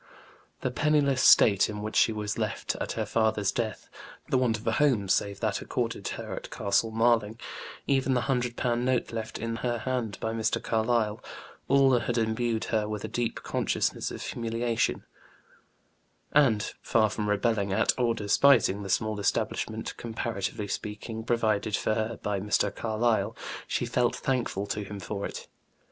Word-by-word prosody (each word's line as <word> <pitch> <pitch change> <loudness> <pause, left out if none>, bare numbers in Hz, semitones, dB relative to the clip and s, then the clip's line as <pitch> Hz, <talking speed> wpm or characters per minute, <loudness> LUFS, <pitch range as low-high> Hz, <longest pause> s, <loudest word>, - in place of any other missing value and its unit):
The 130 - -1
penniless 140 -1 +2
state 100 -3 +6
in 105 -1 -5
which 110 - -4
she - - +5
was 105 -1 -3
left - - -2
at - - -2
her - - -2
father's 110 -3 +1
death, 115 -3 -3 0.4
the 130 - +3
want 120 -4 +2
of 105 - -13
a 115 - +2
home 120 -6 +2
save 100 +1 0
that - - 0
accorded - - -3
her - - -6
at - - -6
Castle 100 +3 +1
Marling, 115 -1 +2 0.5
even 135 -1 +2
the 125 - +2
hundred 125 -2 -1
pound 120 -1 0
note 125 -2 0
left 110 0 -4
in 115 0 -3
her 120 0 -1
hand 115 -3 -2
by 110 - -2
Mr. 110 -1 0
Carlyle, 110 -1 0 0.4
all 135 -2 +5
had 120 0 -2
imbued 115 0 0
her 105 -1 +1
with 105 -1 -4
a - - -2
deep 120 -2 -2
consciousness - - -1
of - - -7
humiliation, 115 0 -1 1.3
and, 125 -8 +3
far 110 -1 +3
from 105 0 -3
rebelling 105 -1 +1
at 110 +3 +3
or 120 -2 +1
despising 105 -1 +4
the 100 - -6
small 110 +2 0
establishment, 100 - -1
comparatively 110 -3 -3
speaking, 105 +3 -5
provided 110 -3 +1
for - - 0
her 110 +1 -2
by 105 -1 -1
Mr. 105 0 0
Carlyle, 110 0 0 0.3
she - - -1
felt - - +1
thankful 120 -6 -1
to 105 +1 -3
him 100 0 -7
for 100 +1 -4
it. - - -8
110 Hz, 165 wpm, -28 LUFS, 105-120 Hz, 1.3 s, state